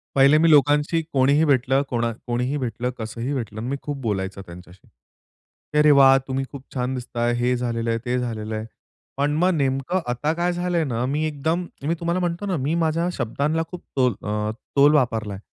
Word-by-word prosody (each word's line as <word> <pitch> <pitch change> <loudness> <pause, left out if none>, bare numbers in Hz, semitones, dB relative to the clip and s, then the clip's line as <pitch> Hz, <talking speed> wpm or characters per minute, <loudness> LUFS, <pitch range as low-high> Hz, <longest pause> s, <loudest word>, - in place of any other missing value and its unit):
पहिले 140 +2 +6
मी 165 - +4
लोकांशी 150 +2 +4
कोणीही 140 +3 +4
भेटलं, 135 -1 +2
कोना 120 -1 0 0.2
कोणीही 125 +4 -1
भेटलं, 125 -2 -3
कसंही 115 +4 -4
भेटलं 110 -5 -4
आणि 120 - -4
मी 140 - -1
खूप 145 -1 -4
बोलायचा 100 -4 -3
त्यांच्याशी. 90 +1 -14 0.9
"अरे 150 0 +6
वाह! 135 -1 +7
तुम्ही 135 0 -2
खूप 140 -2 -9
छान 125 0 -1
दिसताय, 120 -1 -2
हे 125 +1 +1
झालेलं 115 -1 -2
आहे, 115 0 0
ते 125 +1 0
झालेल 110 -3 -4
आहे." 110 0 -3 0.5
पण 145 +1 +1
मग 180 +2 +3
नेमकं 135 +5 0
आता 150 +6 -1
काय 175 +1 0
झालंय 175 -1 0
ना, 120 -2 -2
मी 145 +4 -1
एकदम 160 +4 -1 0.2
मी 165 - +2
तुम्हाला 170 +1 -1
म्हणतो 175 +2 -2
ना 190 -4 -1
मी 145 +4 -1
माझ्या 165 +2 0
शब्दांना 145 +6 -1
खूप 180 - -7 0.2
तोल 125 -2 +3
अ, 105 0 -2 0.2
तोल 145 +1 +6
वापरलाय. 110 -7 0
135 Hz, 185 wpm, -23 LUFS, 120-150 Hz, 0.9 s, वाह